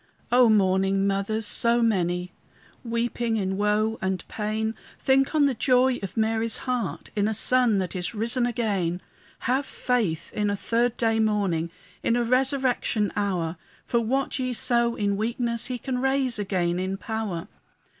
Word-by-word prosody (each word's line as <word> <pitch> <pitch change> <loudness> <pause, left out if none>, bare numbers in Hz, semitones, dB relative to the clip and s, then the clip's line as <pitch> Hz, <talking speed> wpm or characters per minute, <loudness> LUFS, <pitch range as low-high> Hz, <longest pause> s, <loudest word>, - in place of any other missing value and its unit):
O 245 -1 +6
mourning 195 -1 +2
mothers, 200 +3 -1
so 235 +2 +3
many, 180 -4 0 0.5
Weeping 235 -1 -1
in 190 -2 -1
woe 210 +2 +1
and 190 -1 -2
pain, 220 +1 -2 0.3
Think 270 +3 +2
on 295 -2 +5
the 275 - +2
joy 255 +1 +2
of 195 +1 -7
Mary's 225 +1 +1
heart 250 -5 -3
In 205 0 +1
a 220 - -1
Son 245 -1 +4
that 190 0 -2
is 180 +4 -3
risen 235 +3 +1
again. 200 -7 -1 0.4
Have 260 +3 +1
faith 225 - -2
in 210 -1 0
a 205 - 0
third 235 +3 0
day 225 -1 +1
morning, 200 -7 0 0.3
In 235 - +1
a 240 - +1
resurrection 255 -3 +1
hour; 180 -5 -1 0.3
For 235 - +1
what 265 +5 -1
ye 255 -1 -1
sow 235 -1 +1
in 200 -2 0
weakness, 235 +1 -1
He 250 -1 -3
can 250 +1 -3
raise 265 -3 +1
again 180 -3 -1
in 190 +1 -2
power. 210 -5 -4
220 Hz, 155 wpm, -25 LUFS, 195-245 Hz, 0.5 s, O